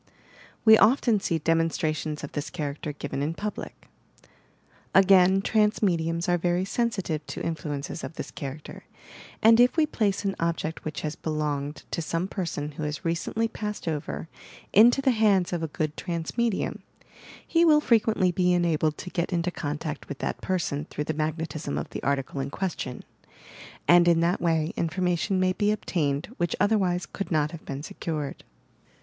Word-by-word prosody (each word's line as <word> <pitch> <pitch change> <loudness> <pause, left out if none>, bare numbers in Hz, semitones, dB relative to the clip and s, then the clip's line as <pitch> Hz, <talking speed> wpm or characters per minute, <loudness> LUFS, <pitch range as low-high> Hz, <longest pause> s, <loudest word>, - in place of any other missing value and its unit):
We 220 -1 +8
often 235 -2 +4
see 170 -3 0
demonstrations 160 -1 0
of 145 - -6
this 145 +1 -4
character 150 -3 -4
given 145 -1 -5
in 155 +3 -1
public. 210 +3 -6 1.1
Again 190 0 +6
(rance 215 0 +3
mediums 170 -3 +1
are 175 -1 +2
very 175 +2 +1
sensitive 195 -9 -1
to - - -5
influences 155 -2 -4
of 160 - -6
this - - -6
character, 140 +1 -8 0.6
and 225 +1 +7
if 245 +6 +5
we 315 - +5
place 205 -9 -1
an 195 - 0
object 165 -1 -2
which 155 0 -4
had 155 0 -5
belonged 150 -2 -2
to - - -1
some 165 +3 -2
person 165 -7 -3
who 150 - -8
has 150 0 -4
recently 170 +7 0
passed 210 -4 -5
over 155 0 -3 0.5
into 240 +6 +6
the 265 - +4
hands 205 -6 +3
of 170 - -1
a 160 - -1
good 155 0 -3
trance 170 -3 -4
medium, 235 -4 0 0.6
he 335 0 +3
will 310 -3 +6
frequently 220 -8 +3
be 180 0 +2
enabled 160 -3 +1
to 180 - -7
get 170 +2 -1
into 175 0 0
contact 150 -1 -5
with 145 - -5
that - - -3
person, 155 -6 -1
through 150 - -4
the 155 - -2
magnetism 155 -1 -3
of - - -3
the - - -5
article 140 0 -1
in 135 +1 -2
question, 155 -7 -4 0.8
and 175 0 +7
in 170 -1 +5
that 170 +2 +1
way 160 -2 +1
information 180 +3 0
may 185 0 +2
be 205 +2 +1
obtained 170 -4 -1
which 175 - 0
otherwise 190 -4 +2
could 200 - -6
not 155 -2 +1
have 165 -2 -9
been 140 +1 -5
secured. 155 -3 -5
170 Hz, 165 wpm, -26 LUFS, 155-195 Hz, 1.1 s, We